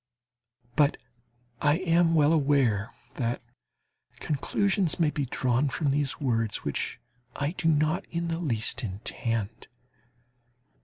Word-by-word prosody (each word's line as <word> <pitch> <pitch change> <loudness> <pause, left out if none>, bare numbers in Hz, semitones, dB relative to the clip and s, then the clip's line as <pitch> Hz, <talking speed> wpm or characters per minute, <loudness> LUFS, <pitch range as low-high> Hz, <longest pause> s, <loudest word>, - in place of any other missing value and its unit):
But 145 -1 +3 0.6
I 145 0 +4
am 170 -2 +3
well 150 0 +5
aware 135 -7 +2 0.3
that 120 -2 -1 0.8
conclusions 190 +4 0
may 160 -3 +3
be 145 -3 -2
drawn 130 +3 +1
from 140 +1 0
these 145 -1 -1
words 115 -6 0
which - - -3 0.4
I 145 +1 -1
do 175 -2 -2
not 155 +2 +2
in 170 0 -2
the 165 0 -2
least 120 -6 -1
intend. 110 +1 -3
145 Hz, 115 wpm, -28 LUFS, 120-165 Hz, 0.8 s, well